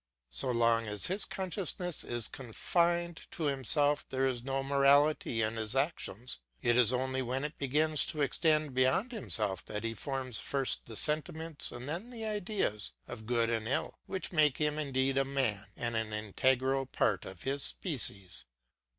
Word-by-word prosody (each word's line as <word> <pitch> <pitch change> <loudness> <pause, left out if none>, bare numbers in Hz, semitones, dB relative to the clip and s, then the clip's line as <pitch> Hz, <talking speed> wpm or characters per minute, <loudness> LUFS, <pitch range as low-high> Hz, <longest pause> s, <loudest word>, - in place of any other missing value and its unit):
So 65 - -1
long 115 -1 +2
as 105 -1 +7
his 190 +3 +1
consciousness 180 -3 -2
is 120 -2 -1
confined 170 +7 -1
to 165 - -5
himself 145 +1 +2
there 135 0 0
is 125 -3 -1
no 135 +1 -2
morality 140 -3 +3
in 110 +1 -1
his 110 +2 +2
actions; 135 - 0 0.2
it 120 0 +2
is 125 -2 +5
only 130 +1 -1
when 130 +2 -2
it 150 +1 -4
begins 150 +3 +2
to 150 -3 -1
extend 155 0 +2
beyond 130 - +2
himself 105 - 0
that 105 0 -4
he 115 0 -2
forms 130 0 -3
first 135 -2 -1
the 115 - -8
sentiments 155 +3 0
and 120 +2 -8
then 175 +10 -4
the 230 -3 -6
ideas 195 - -2
of 110 0 -8
good 115 -1 +1
and 110 -1 -1
ill, 135 - -2
which 190 -1 -4
make 150 -5 +3
him 150 0 0
indeed 135 -2 0
a - - +3
man, 130 -7 -1
and 120 -1 -2
an 110 -1 -2
integral 130 +5 +1
part 95 -7 0
of 95 -2 -10
his 140 +1 -2
species. 100 - -1
135 Hz, 170 wpm, -32 LUFS, 115-155 Hz, 0.2 s, as